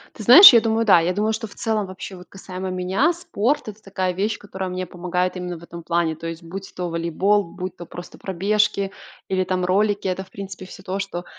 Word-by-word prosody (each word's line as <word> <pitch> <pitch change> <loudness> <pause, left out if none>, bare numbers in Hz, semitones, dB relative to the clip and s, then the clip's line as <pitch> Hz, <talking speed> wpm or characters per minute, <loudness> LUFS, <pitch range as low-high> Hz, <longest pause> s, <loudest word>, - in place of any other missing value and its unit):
Ты 215 - -8
знаешь, 275 - +11
я 230 - +7
думаю, 225 0 0
да. 190 -5 +7
Я 175 +2 0
думаю, 215 +3 0
что 225 0 -4
в - - -16
целом, 220 -3 -1
вообще, 190 +1 -8
вот 180 0 -13
касаемо 190 -1 -7
меня, 185 - +1
спорт- 300 - -1
это 215 0 -9
такая 185 -2 -2
вещь, 205 +4 -1
которая 190 -2 -6
мне 185 0 -4
помогает 180 +1 -2
именно 180 -1 -5
в 165 - -15
этом 170 0 -10
плане. 170 -2 0
То 165 +2 -7
есть, 165 +1 -6
будь 190 +3 -8
то 180 -1 -3
волейбол, 170 +5 +1
будь 185 +1 -7
то 175 - -8
просто 175 +2 -10
пробежки 200 +1 0 0.4
или 185 -1 0
там 185 0 -1
ролики- 200 +2 +1
это, 185 +1 -2
в - - -21
принципе, 195 -1 -8
всё 190 +1 -12
то, 195 +1 -4
что, 180 -3 -5
190 Hz, 225 wpm, -22 LUFS, 180-205 Hz, 0.4 s, знаешь